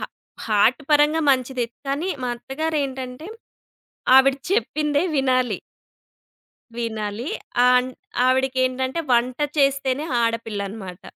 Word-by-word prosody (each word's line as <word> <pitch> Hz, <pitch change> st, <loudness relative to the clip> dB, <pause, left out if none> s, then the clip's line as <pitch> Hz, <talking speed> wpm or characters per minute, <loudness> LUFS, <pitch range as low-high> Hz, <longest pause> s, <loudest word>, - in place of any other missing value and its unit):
హ -, -, -10 dB, 0.4 s
హార్ట్ 220 Hz, +6 st, +3 dB
పరంగా 300 Hz, +2 st, +4 dB
మంచిదే. 255 Hz, -2 st, 0 dB, 0.2 s
కానీ, 290 Hz, +7 st, -1 dB, 0.2 s
మా 245 Hz, -, -1 dB
అత్తగారేంటంటే, 270 Hz, +1 st, -4 dB, 0.9 s
ఆవిడ 265 Hz, 0 st, +6 dB, 0.2 s
చెప్పిందే 300 Hz, -, +1 dB
వినాలి. 255 Hz, -6 st, +1 dB, 1.2 s
వినాలి. 220 Hz, +1 st, -3 dB, 0.4 s
ఆన్ 250 Hz, 0 st, +3 dB, 0.4 s
ఆవిడికేంటంటే 260 Hz, +2 st, +1 dB
వంట 245 Hz, +1 st, +2 dB, 0.2 s
చేస్తేనే 275 Hz, 0 st, +1 dB, 0.2 s
ఆడపిల్లనమాట. 210 Hz, -5 st, -4 dB
255 Hz, 85 wpm, -22 LUFS, 235-275 Hz, 1.2 s, ఆవిడ